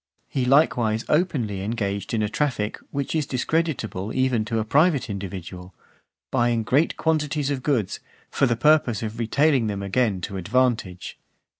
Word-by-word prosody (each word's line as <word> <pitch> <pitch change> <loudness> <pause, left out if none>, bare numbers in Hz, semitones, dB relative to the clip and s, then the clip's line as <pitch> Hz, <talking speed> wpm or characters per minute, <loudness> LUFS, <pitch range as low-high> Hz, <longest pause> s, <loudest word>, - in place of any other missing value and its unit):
He 130 -2 -1
likewise 125 -5 +3
openly 130 - 0
engaged 100 -2 -3
in 110 -2 0
a - - +1
traffic, 110 -3 -1
which 140 -1 -3
is 155 -3 0
discreditable 130 - -1
even 130 -4 +2
to 115 +1 -2
a 110 - 0
private 140 -1 +2
individual, 90 -2 -7 0.6
buying 120 -1 +1
great 140 +8 +1
quantities 150 -3 0
of 135 -2 -2
goods, 125 -9 0 0.3
for 135 - +2
the 120 -2 0
purpose 145 -7 +3
of 110 +1 -5
retailing 130 +1 +2
them 100 -1 -3
again 100 0 +1
to 95 +3 -5
advantage. 105 -2 -1
120 Hz, 150 wpm, -24 LUFS, 105-140 Hz, 0.6 s, likewise